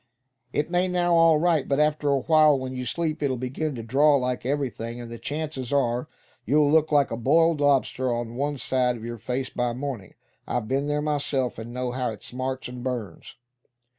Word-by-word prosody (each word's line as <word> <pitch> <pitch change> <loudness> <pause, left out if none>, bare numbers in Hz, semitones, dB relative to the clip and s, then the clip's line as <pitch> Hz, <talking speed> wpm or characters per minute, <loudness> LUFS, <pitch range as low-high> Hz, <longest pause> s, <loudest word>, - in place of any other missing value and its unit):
"It 150 +5 -1
may 180 +1 +2
now, 175 -1 +1
all 165 -2 +6
right, 165 -2 +2
but 140 0 +1
after 150 -1 +2
a 140 -1 +2
while, 155 -1 +5
when 130 0 -5
you 125 0 -4
sleep, 160 +4 -2
it'll 135 -3 0
begin 135 +4 -3
to 115 - -6
draw 140 +6 +4
like 125 -2 -1
everything; 125 -4 -3
and 120 -1 -8
the 115 - -7
chances 145 -4 -4
are, 125 -3 +1 0.4
you'll 145 +4 +3
look 155 0 +3
like 145 -2 +3
a - - -1
boiled 165 +6 +3
lobster 135 -2 +2
on 120 -1 -3
one 140 +3 -2
side 125 -2 0
of 115 - -9
your 120 -1 -6
face 125 +4 -3
by 120 -1 -1
morning. 125 -7 -6 0.3
I've 110 - -2
been 135 +3 0
there 150 0 0
myself, 140 -5 -1
and 115 +1 -7
know 125 0 -3
how 125 0 -1
it 110 - -8
smarts 130 +1 -4
and 125 0 -8
burns." 125 -6 -5
135 Hz, 200 wpm, -25 LUFS, 125-150 Hz, 0.4 s, all